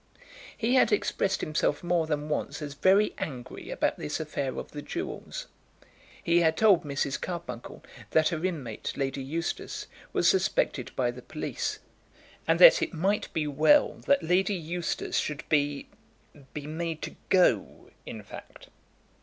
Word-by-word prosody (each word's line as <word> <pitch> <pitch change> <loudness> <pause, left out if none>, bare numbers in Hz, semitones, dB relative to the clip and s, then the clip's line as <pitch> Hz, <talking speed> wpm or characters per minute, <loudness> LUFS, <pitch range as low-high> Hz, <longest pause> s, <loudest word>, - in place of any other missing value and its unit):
He 235 +2 +1
had 260 - +5
expressed 195 -1 +1
himself 155 -1 0
more 175 -2 +1
than 150 -1 -2
once 150 -1 -2
as 145 -2 -6
very 195 +8 +3
angry 125 -5 -6
about - - -1
this 75 - -3
affair 140 -4 -3
of - - -6
the 145 - -6
jewels. 380 - -5 0.8
He 170 0 +4
had 160 -1 +2
told 200 -6 +5
Mrs. 140 -1 -2
Carbuncle 170 -9 -6 0.3
that 155 -1 +3
her 165 -2 -3
inmate, 145 -12 -3
Lady 135 0 -2
Eustace, 160 +6 -4 0.3
was - - +2
suspected 450 +6 +1
by - - +1
the - - -10
police, - - -4 0.7
and - - +4
that - - +9
it - - -2
might 195 +6 0
be 155 -2 -1
well 155 - +4
that 280 0 +4
Lady 185 +4 +2
Eustace 170 0 -2
should 150 -1 -4
be 145 -2 +1 0.6
be 145 -1 -6
made 160 +1 -4
to - - -6
go, 150 - +2
in - - -8
fact. - - -12
160 Hz, 150 wpm, -28 LUFS, 145-190 Hz, 0.8 s, that